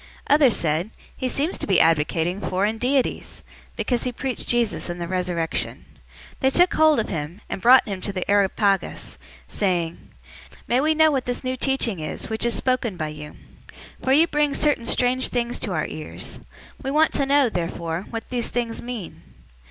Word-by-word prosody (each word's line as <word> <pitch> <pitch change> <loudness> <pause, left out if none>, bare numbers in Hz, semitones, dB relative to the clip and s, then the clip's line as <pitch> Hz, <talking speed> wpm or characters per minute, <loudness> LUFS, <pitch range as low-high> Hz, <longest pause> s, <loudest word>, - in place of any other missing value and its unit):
Others 285 -5 +5
said, 165 +4 0 0.3
"He 255 - -2
seems 295 +8 -1
to - - -3
be 190 -3 +4
advocating 165 +3 +2
foreign 205 +4 -1
deities," 260 +2 -1 0.3
because 245 -2 -1
he 250 - -2
preached 255 +1 -3
Jesus 235 -6 +1
and 175 0 -5
the 170 - -4
resurrection. 175 -2 -2 0.5
017:019 - - -30
They 265 - +3
took 350 +6 +4
hold 310 -3 +4
of 220 - -1
him, 165 +3 -5
and - - -5
brought 250 +4 +6
him 195 -3 -4
to 200 - -3
the 185 -2 -4
Areopagus, 200 -1 +1 0.3
saying, 175 -5 -2 0.6
"May 245 +2 +2
we 310 +2 +2
know 315 0 +5
what 265 -3 -1
this 245 +1 -3
new 255 0 -1
teaching 255 -7 -1
is, 155 +7 -5
which 220 +2 0
is 235 - 0
spoken 250 -6 0
by 155 -2 -3
you? 150 0 -9 0.7
017:020 - - -13
For 265 - +3
you 310 +4 +6
bring 295 -3 +1
certain 290 -6 +2
strange 255 +2 +2
things 240 0 -2
to 215 - -1
our 155 -3 -1
ears. 155 -1 -5 0.4
We 270 - -3
want 310 +3 +3
to 275 - 0
know 280 -1 +4
therefore 170 -2 -3
what 225 -1 -6
these 245 -2 -1
things 235 -2 -2
mean." 230 - -7
230 Hz, 185 wpm, -23 LUFS, 180-260 Hz, 0.7 s, brought